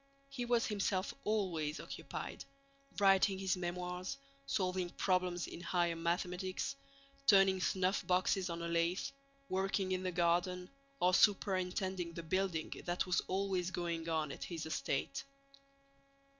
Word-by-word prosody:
He 260 Hz, -3 st, -3 dB
was 240 Hz, -1 st, +3 dB
himself 195 Hz, -2 st, 0 dB
always 175 Hz, -8 st, 0 dB
occupied: -, -, -6 dB, 0.5 s
writing 195 Hz, -1 st, +5 dB
his 190 Hz, 0 st, +1 dB
memoirs, 180 Hz, +4 st, -3 dB, 0.3 s
solving 185 Hz, -2 st, 0 dB
problems 180 Hz, -1 st, +1 dB
in 170 Hz, -, -8 dB
higher 175 Hz, -2 st, +1 dB
mathematics, 180 Hz, +6 st, -1 dB, 0.5 s
turning 195 Hz, -2 st, +6 dB
snuffboxes 185 Hz, 0 st, +1 dB
on 170 Hz, 0 st, -4 dB
a -, -, -1 dB
lathe, 170 Hz, +2 st, +1 dB, 0.4 s
working 190 Hz, -1 st, 0 dB
in 185 Hz, 0 st, 0 dB
the 185 Hz, -1 st, -1 dB
garden, 175 Hz, +1 st, +1 dB, 0.3 s
or 180 Hz, +1 st, +4 dB
superintending 185 Hz, -3 st, +2 dB
the 170 Hz, -, -6 dB
building 180 Hz, -1 st, 0 dB
that 175 Hz, 0 st, 0 dB
was 180 Hz, -1 st, +2 dB
always 190 Hz, -1 st, 0 dB
going 170 Hz, -2 st, -2 dB
on 155 Hz, -3 st, 0 dB
at -, -, -6 dB
his 165 Hz, -3 st, -4 dB
estate. 160 Hz, -, -2 dB
180 Hz, 125 wpm, -36 LUFS, 175-190 Hz, 0.5 s, turning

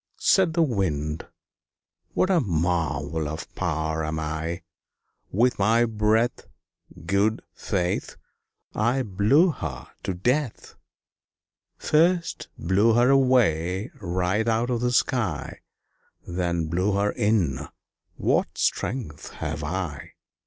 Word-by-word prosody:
Said 180 Hz, -4 st, +3 dB
the 170 Hz, -, +4 dB
Wind 80 Hz, -, -1 dB, 0.9 s
"What 185 Hz, -, +2 dB
a 180 Hz, -, +4 dB
marvel 80 Hz, -, -1 dB
of 80 Hz, +3 st, -7 dB
power 80 Hz, -3 st, -1 dB
am 80 Hz, +1 st, -2 dB
I! 80 Hz, +2 st, -3 dB, 0.7 s
With 120 Hz, +4 st, +2 dB
my 115 Hz, +4 st, +4 dB
breath, 110 Hz, +1 st, +1 dB, 0.6 s
Good 100 Hz, +4 st, +1 dB
faith! 90 Hz, -3 st, -2 dB, 0.6 s
I 120 Hz, +5 st, +1 dB
blew 110 Hz, -, +3 dB
her 75 Hz, -, -6 dB
to 95 Hz, -, -3 dB
death 125 Hz, +7 st, -1 dB, 1.0 s
First 170 Hz, +3 st, +1 dB
blew 100 Hz, +7 st, +3 dB
her 120 Hz, +3 st, +4 dB
away 110 Hz, -, +2 dB
right 95 Hz, +3 st, 0 dB
out 115 Hz, +2 st, +1 dB
of 120 Hz, -1 st, -1 dB
the 125 Hz, 0 st, +1 dB
sky 120 Hz, -, 0 dB, 0.7 s
Then 85 Hz, -2 st, -1 dB
blew 90 Hz, +6 st, 0 dB
her 100 Hz, +1 st, +1 dB
in; 105 Hz, -, 0 dB, 0.5 s
what -, -, 0 dB
strength 100 Hz, -, -2 dB
have 75 Hz, +1 st, -4 dB
I!" 80 Hz, -3 st, -4 dB
100 Hz, 110 wpm, -25 LUFS, 80-120 Hz, 1.0 s, the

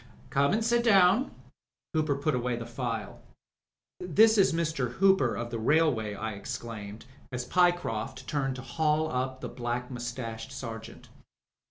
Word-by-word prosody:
"Come 140 Hz, +1 st, +3 dB
and 220 Hz, +1 st, +1 dB
sit 235 Hz, +1 st, +2 dB
down," 200 Hz, +2 st, +5 dB, 0.6 s
Hooper 155 Hz, -3 st, +1 dB
put 145 Hz, +2 st, 0 dB
away 125 Hz, -1 st, 0 dB
the 115 Hz, 0 st, -6 dB
file. 115 Hz, -3 st, -4 dB, 0.8 s
"This 215 Hz, +5 st, +4 dB
is 195 Hz, -, +5 dB
Mr. 155 Hz, -7 st, -1 dB
Hooper 190 Hz, -8 st, +3 dB
of 120 Hz, 0 st, -4 dB
the 115 Hz, -, -3 dB
Railway," 120 Hz, -5 st, +2 dB
I 110 Hz, +2 st, -4 dB
exclaimed, 110 Hz, -1 st, -7 dB, 0.3 s
as 125 Hz, -1 st, -3 dB
Pyecroft 130 Hz, -8 st, +1 dB
turned 135 Hz, -3 st, -1 dB
to 130 Hz, -, -8 dB
haul 155 Hz, +4 st, 0 dB
up 130 Hz, +1 st, -2 dB
the -, -, -4 dB
black 120 Hz, +1 st, -4 dB
moustached 120 Hz, -2 st, -5 dB
sergeant. 115 Hz, -2 st, -8 dB
130 Hz, 145 wpm, -29 LUFS, 115-160 Hz, 0.8 s, down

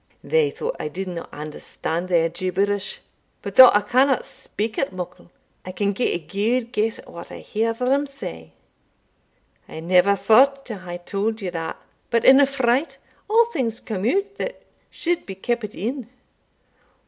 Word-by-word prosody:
They 475 Hz, -2 st, +2 dB
thought -, -, -4 dB
I -, -, -3 dB
didna 180 Hz, +1 st, -6 dB
understand 155 Hz, +3 st, -5 dB
their 170 Hz, -2 st, +3 dB
gibberish; 195 Hz, +3 st, -1 dB, 0.4 s
but, -, -, -6 dB
though 255 Hz, -1 st, +11 dB
I 205 Hz, -, +3 dB
canna 255 Hz, +5 st, +2 dB
speak 220 Hz, +2 st, -5 dB
it 270 Hz, -, 0 dB
muckle, 180 Hz, -1 st, -8 dB, 0.3 s
I 185 Hz, -, -6 dB
can 200 Hz, +2 st, 0 dB
gie 245 Hz, +5 st, 0 dB
a -, -, +1 dB
gude 220 Hz, +8 st, -1 dB
guess 220 Hz, -2 st, 0 dB
at -, -, -14 dB
what 170 Hz, -, -10 dB
I -, -, -7 dB
hear 225 Hz, +2 st, -1 dB
them 265 Hz, +5 st, +1 dB
say 80 Hz, -, -9 dB, 1.2 s
I -, -, -7 dB
never 180 Hz, +4 st, +4 dB
thought 275 Hz, +7 st, +4 dB
to 220 Hz, -5 st, -6 dB
hae 175 Hz, -1 st, -7 dB
tauld 205 Hz, +5 st, -2 dB
ye 185 Hz, -, -2 dB
that, 165 Hz, -1 st, -4 dB, 0.3 s
but 230 Hz, -1 st, +1 dB
in 265 Hz, +1 st, +9 dB
a 280 Hz, -, +5 dB
fright 265 Hz, +2 st, 0 dB, 0.3 s
a' 460 Hz, +2 st, +5 dB
things 230 Hz, -4 st, -1 dB
come 215 Hz, 0 st, -2 dB
out 400 Hz, +4 st, -1 dB
that -, -, -5 dB, 0.3 s
suld 345 Hz, 0 st, -2 dB
be 195 Hz, -, -6 dB
keepit 215 Hz, +1 st, -3 dB
in. 240 Hz, +3 st, -4 dB
215 Hz, 165 wpm, -23 LUFS, 185-260 Hz, 1.2 s, though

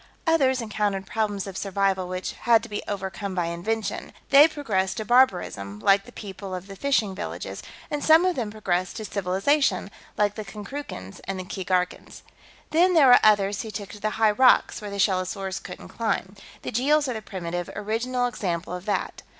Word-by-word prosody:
Others 270 Hz, -6 st, +3 dB
encountered 210 Hz, -3 st, -1 dB
problems 205 Hz, -2 st, -2 dB
of 195 Hz, -2 st, -8 dB
survival 195 Hz, -1 st, 0 dB
which 185 Hz, 0 st, -4 dB
had 230 Hz, -1 st, +3 dB
to 230 Hz, -, -9 dB
be 210 Hz, -, -3 dB
overcome 195 Hz, 0 st, -4 dB
by 175 Hz, -2 st, 0 dB
invention. 200 Hz, +5 st, -3 dB, 0.2 s
They 285 Hz, +2 st, +9 dB
progressed 215 Hz, -11 st, -1 dB
to 220 Hz, -, -3 dB
barbarism, 180 Hz, -, +2 dB
like 195 Hz, -, +3 dB
the 245 Hz, -, -13 dB
people 195 Hz, -3 st, -7 dB
of 180 Hz, 0 st, -7 dB
the 195 Hz, 0 st, -10 dB
fishing 225 Hz, -5 st, +1 dB
villages, 190 Hz, -, -6 dB, 0.3 s
and 295 Hz, -1 st, -2 dB
some 320 Hz, +3 st, +6 dB
of 365 Hz, -1 st, +1 dB
them 235 Hz, -5 st, -2 dB
progressed 185 Hz, -4 st, -2 dB
to 220 Hz, -, -5 dB
civilization, 195 Hz, +3 st, +1 dB, 0.3 s
like 205 Hz, -1 st, +2 dB
the 215 Hz, -, -6 dB
Konkrookans 200 Hz, -, -8 dB
and 195 Hz, 0 st, -4 dB
the -, -, -4 dB
Keegarkans. 180 Hz, -1 st, -3 dB, 0.5 s
"Then, 355 Hz, +3 st, +4 dB
there 285 Hz, -5 st, +7 dB
were 245 Hz, -, +9 dB
others 205 Hz, -2 st, +4 dB
who 220 Hz, -, -7 dB
took 205 Hz, -2 st, -6 dB
to 210 Hz, -, -10 dB
the 215 Hz, -, -1 dB
high 220 Hz, -1 st, +4 dB
rocks, 255 Hz, +1 st, +4 dB
where 210 Hz, -, -6 dB
the 200 Hz, -, -6 dB
shellosaurs 190 Hz, 0 st, 0 dB
couldn't 180 Hz, -, -9 dB
climb. 215 Hz, -4 st, -2 dB, 0.3 s
The -, -, -4 dB
Jeels 290 Hz, +5 st, +2 dB
are 255 Hz, -, -1 dB
the 220 Hz, -, -5 dB
primitive, 175 Hz, -4 st, -5 dB
original 235 Hz, +4 st, -1 dB
example 180 Hz, -7 st, -3 dB
of 180 Hz, +1 st, -6 dB
that. 210 Hz, -, -2 dB
205 Hz, 185 wpm, -25 LUFS, 190-240 Hz, 0.5 s, They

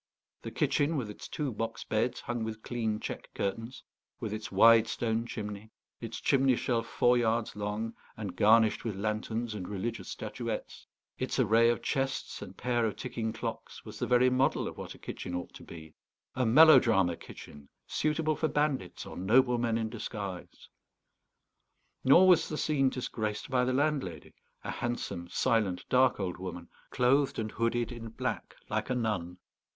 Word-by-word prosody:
The -, -, -6 dB
kitchen, 150 Hz, +2 st, +1 dB
with 115 Hz, -6 st, -3 dB
its -, -, -10 dB
two 145 Hz, -4 st, -3 dB
box 115 Hz, +1 st, -4 dB
beds 115 Hz, +3 st, -1 dB
hung 120 Hz, -1 st, -3 dB
with 110 Hz, 0 st, -5 dB
clean 110 Hz, -3 st, -2 dB
check -, -, -6 dB
curtains, 115 Hz, +6 st, -4 dB, 0.4 s
with 110 Hz, -, -4 dB
its 105 Hz, -2 st, -5 dB
wide 115 Hz, +3 st, +6 dB
stone 115 Hz, 0 st, -1 dB
chimney, 105 Hz, -1 st, -6 dB, 0.3 s
its 115 Hz, -1 st, -6 dB
chimney 135 Hz, -2 st, +3 dB
shelf 115 Hz, -1 st, -1 dB
four 120 Hz, +1 st, +3 dB
yards 115 Hz, -1 st, 0 dB
long 105 Hz, +2 st, -3 dB, 0.2 s
and 100 Hz, -5 st, -5 dB
garnished 110 Hz, +3 st, +4 dB
with 110 Hz, -4 st, -3 dB
lanterns 110 Hz, +3 st, -2 dB
and 95 Hz, -4 st, -5 dB
religious 105 Hz, 0 st, -4 dB
statuettes, -, -, -5 dB, 0.3 s
its 130 Hz, -, -2 dB
array 115 Hz, -1 st, +4 dB
of 120 Hz, -, -1 dB
chests 135 Hz, -1 st, -2 dB
and 95 Hz, -2 st, -9 dB
pair 120 Hz, -1 st, 0 dB
of 105 Hz, -, -4 dB
ticking 115 Hz, -3 st, -3 dB
clocks, -, -, -6 dB
was -, -, -9 dB
the -, -, -1 dB
very 125 Hz, +1 st, +5 dB
model 130 Hz, +2 st, +2 dB
of -, -, -6 dB
what -, -, -8 dB
a -, -, -14 dB
kitchen 90 Hz, -, -6 dB
ought 90 Hz, -, -5 dB
to -, -, -12 dB
be; 80 Hz, -2 st, -11 dB, 0.4 s
a 125 Hz, -2 st, +1 dB
melodrama 115 Hz, -, +6 dB
kitchen, 75 Hz, -3 st, -12 dB, 0.2 s
suitable 155 Hz, 0 st, 0 dB
for 160 Hz, -, 0 dB
bandits 145 Hz, -, -1 dB
or -, -, -9 dB
noblemen 120 Hz, +3 st, +3 dB
in 110 Hz, -1 st, -1 dB
disguise. 100 Hz, -5 st, -7 dB, 1.4 s
Nor 170 Hz, +8 st, +7 dB
was 180 Hz, -3 st, +5 dB
the 155 Hz, -, -3 dB
scene 140 Hz, -4 st, +2 dB
disgraced 110 Hz, -4 st, -4 dB
by 125 Hz, -1 st, +3 dB
the 125 Hz, -, +1 dB
landlady, 135 Hz, -, -1 dB, 0.3 s
a -, -, -4 dB
handsome, 120 Hz, -7 st, -4 dB
silent, 105 Hz, -6 st, +1 dB
dark 130 Hz, -3 st, +4 dB
old 90 Hz, -3 st, -3 dB
woman, 90 Hz, -2 st, -7 dB, 0.2 s
clothed 135 Hz, +3 st, +2 dB
and 110 Hz, -1 st, -3 dB
hooded 115 Hz, +1 st, 0 dB
in 115 Hz, -2 st, -7 dB
black 110 Hz, -, -4 dB
like -, -, -2 dB
a 125 Hz, -, 0 dB
nun. 100 Hz, -7 st, -2 dB
115 Hz, 165 wpm, -30 LUFS, 105-125 Hz, 1.4 s, Nor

